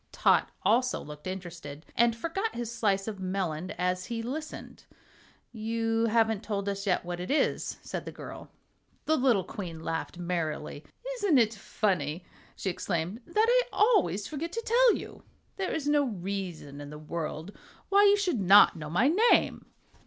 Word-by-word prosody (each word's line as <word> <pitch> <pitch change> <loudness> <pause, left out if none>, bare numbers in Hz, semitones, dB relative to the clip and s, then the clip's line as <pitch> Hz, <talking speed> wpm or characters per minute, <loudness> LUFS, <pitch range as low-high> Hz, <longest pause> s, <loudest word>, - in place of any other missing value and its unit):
Tot - - +3
also 250 +2 +2
looked 150 +3 -9
interested, 170 -5 -7
and 235 0 +4
forgot 385 - -3
his 235 -1 -4
slice 200 -4 +1
of 210 -3 -5
melon 185 -3 -2
as 180 0 0
he 230 -1 -4
listened. 305 +6 -6 0.7
"You 225 0 0
haven't 225 -2 +2
told 205 -3 -3
us 200 0 -3
yet 180 -2 +1
what 175 0 -4
it 180 - -5
is," 295 - 0
said - - -5
the - - -6
girl. - - -9 0.6
The 315 - +3
little 250 -8 +3
Queen 175 -3 -7
laughed 165 +1 -3
merrily. 160 -4 -3 0.3
"Isn't 400 - +3
it 230 -2 +4
funny," 180 -6 -1 0.3
she 190 - -2
exclaimed, 175 +5 -3
"that 425 +6 +3
I - - +5
always 210 - +3
forget 315 +2 -4
to 460 - -3
tell 485 0 +5
you? - - -8 0.4
There 385 -2 -2
is 300 -3 -2
no 295 -1 +3
reason 185 - -5
in 145 - -8
the 150 - -8
world 160 +3 -5 0.3
why 400 +1 +6
you 405 0 +6
should 360 - 0
not 200 +1 +7
know 150 -2 -7
my 175 - +3 0.2
name." - - +2
205 Hz, 165 wpm, -29 LUFS, 175-255 Hz, 0.7 s, not